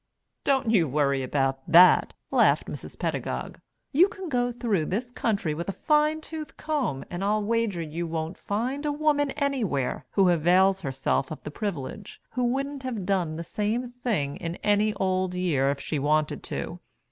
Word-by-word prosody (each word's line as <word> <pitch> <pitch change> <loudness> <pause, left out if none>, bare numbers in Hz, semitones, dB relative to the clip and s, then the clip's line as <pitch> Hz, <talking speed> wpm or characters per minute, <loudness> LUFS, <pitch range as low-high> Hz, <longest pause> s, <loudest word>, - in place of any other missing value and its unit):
"Don't 265 -4 +2
you 180 -8 +4
worry 140 -1 +1
about 135 0 0
that," 180 +2 +7 0.2
laughed - - +4
Mrs. - - -8
Pedagog. - - -3 0.3
"You 340 +7 +6
can 385 -3 -7
go 245 -3 +1
through 220 -9 0
this 235 +9 -3
country 205 -10 -1
with 170 +5 -4
a - - -1
fine 305 - +2
tooth 310 -1 -7
comb 280 - -2
and 175 +2 -3
I'll 210 +1 +1
wager 220 -5 0
you 155 - -9
you 170 +2 -3
won't 160 +1 -3
find 250 +8 -2
a - - +1
woman 290 -1 +1
anywhere 235 - -1
who 195 -3 +4
avails 185 +3 +4
herself 135 -2 -1
of 155 - -8
the - - -6
privilege 195 +1 -5
who 250 - -1
wouldn't 275 +3 -1
have 240 -8 -4
done 180 -5 0
the 165 - -4
same 220 +7 -2
thing 220 - -2
in 170 0 -4
any 210 0 +2
old 185 -1 0
year 155 -7 +1
if 140 0 -1
she 150 - -2
wanted 150 +2 +1
to. - - -5
195 Hz, 175 wpm, -26 LUFS, 160-245 Hz, 0.3 s, that